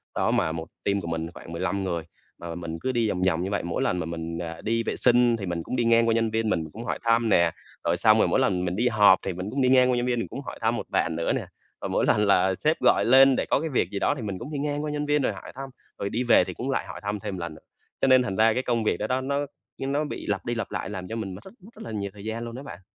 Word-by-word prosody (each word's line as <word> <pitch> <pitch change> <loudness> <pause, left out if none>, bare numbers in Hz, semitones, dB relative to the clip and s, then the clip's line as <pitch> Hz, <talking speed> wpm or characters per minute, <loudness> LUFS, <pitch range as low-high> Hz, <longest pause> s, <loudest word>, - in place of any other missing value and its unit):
Đó, - - +1
mà 80 - +1
1 80 +1 -5 0.2
team 100 0 +1
của 85 - -7
mình 80 0 -2
thì - - -10
khoảng - - -11
15 95 +4 -2
người, 85 -3 -2 0.4
mà 85 -1 -6
mình 85 -1 -5
cứ 130 - 0
đi 120 -3 +1
vòng 90 - -2
vòng 85 -1 +1
như 95 - -2
vậy, 100 - -1
mỗi 85 -1 -2
lần 90 - 0
mà 85 - -2
mình, 85 0 -5
à, 85 -1 -6
đi 115 +1 0
vệ - - -2
sinh 120 -1 +4
thì 100 - -5
mình 85 -2 -3
cũng - - -4
đi 120 - +1
ngang 115 0 +4
qua 115 - +3
nhân 115 0 +1
viên 110 0 0
mình 85 -6 0
cũng 115 +2 -7
hỏi - - -2
thăm 115 0 +3
nè. 85 -4 +4 0.3
Rồi - - +2
xong - - +5
rồi - - +4
mỗi - - +2
lần 90 -2 +1
mình 90 0 -2
đi 120 +5 +1
họp 105 -5 +6
thì 95 - -2
mình 90 +3 -5
cũng 135 +5 -1
đi 130 - +3
ngang 130 -1 +5
qua 125 - +1
nhân 120 - 0
viên 125 -1 0
mình 115 - -3
cũng - - -7
hỏi - - -7
thăm - - +1
một - - -4
bạn 80 - 0
nữa 85 0 0
nè - - -2 0.4
và - - -3
mỗi - - +1
lần 105 - +3
là 95 -1 +3
sếp 155 - +1
gọi - - +4
lên 135 +2 +7
để - - 0
có - - +2
cái 160 - -3
việc 130 - +1
gì 100 - -3
đó - - +1
thì 135 - -6
mình 100 -4 -4
cũng 125 - -7
đi 145 - -2
ngang 145 +1 -2
qua 150 - -2
nhân 150 0 -2
viên 150 0 +2
rồi - - 0
hỏi - - -10
thăm, 135 +1 -6 0.3
rồi 100 - -2
đi 120 +4 -1
về 120 - +5
thì - - -6
cũng 130 - -5
lại 135 - -1
hỏi - - -8
thăm 100 +1 -2
thêm 100 -1 -5
một - - -6
lần 85 -2 -5
nữa. 80 - -15 0.4
Cho - - +3
nên 130 -1 +6
thành 100 -6 -3
ra 110 +2 +4
cái 125 - -1
công 120 -3 0
việc 105 - +1
đó 105 - -2
đó, 130 +3 0
nó 140 +2 -1 0.4
nó 140 +3 0
bị 145 - -6
lặp 100 -2 -2
đi 120 - -1
lặp 115 - -4
lại - - -3
làm 95 -3 -6
cho 110 - -5
mình 105 -4 -4
mất - - -12
rất 190 - -13 0.2
rất - - -10
là 115 - -7
nhiều 100 -2 -3
thời 100 -1 -12
gian 110 +1 -3
luôn 115 0 -7
đó 130 - -7
bạn. 90 -10 -9
110 Hz, 335 wpm, -26 LUFS, 90-125 Hz, 0.4 s, lên